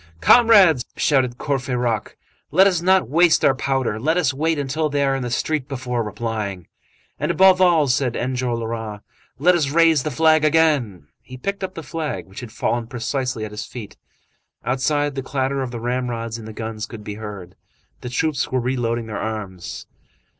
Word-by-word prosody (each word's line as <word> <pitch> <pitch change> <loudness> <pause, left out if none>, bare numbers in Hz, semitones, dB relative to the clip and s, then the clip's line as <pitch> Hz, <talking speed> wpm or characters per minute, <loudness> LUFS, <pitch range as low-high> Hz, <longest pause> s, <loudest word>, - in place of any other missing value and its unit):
"Comrades!" 195 - +6
shouted 130 -4 +1
Courfeyrac, 125 -6 -2 0.3
"let 185 +6 +5
us 180 -4 +2
not 185 +1 +3
waste 170 +3 +4
our 135 - +5
powder. 130 -5 -1
Let 160 +8 +1
us 150 -7 +2
wait 160 +3 0
until 145 +3 -1
they 145 0 0
are 135 -1 +1
in 135 - -3
the 125 - -3
street 140 +3 -1
before 125 -3 -3
replying." 105 -4 -4 0.5
"And, - - -1
above 190 0 +5
all," 170 -5 +4
said 125 -1 0
Enjolras, 115 -4 -3 0.4
"let 175 +7 +4
us 160 -6 +1
raise 165 -1 +4
the 155 - -2
flag 160 0 +3
again." 145 - +2 0.2
He 130 - -11
picked 200 +9 -4
up 185 0 -4
the 165 - -6
flag, 150 - -4
which 95 +1 -11
had 120 -3 -9
fallen 120 0 -2
precisely 125 -1 -3
at 105 - -8
his 105 - -6
feet. 115 -5 -9 0.7
Outside, 145 +3 0
the 135 - -3
clatter 135 0 -2
of 130 - -3
the 120 -1 -6
ramrods 120 -1 -3
in 110 - -10
the 110 - -7
guns 110 0 -5
could 115 -3 -10
be 105 - -6
heard; 100 -4 -8 0.5
the 125 - -6
troops 145 +2 -1
were 130 - +1
re 125 +2 -1
loading 120 -1 -1
their 110 -1 -5
arms. 100 -5 -6
130 Hz, 180 wpm, -21 LUFS, 115-155 Hz, 0.7 s, Comrades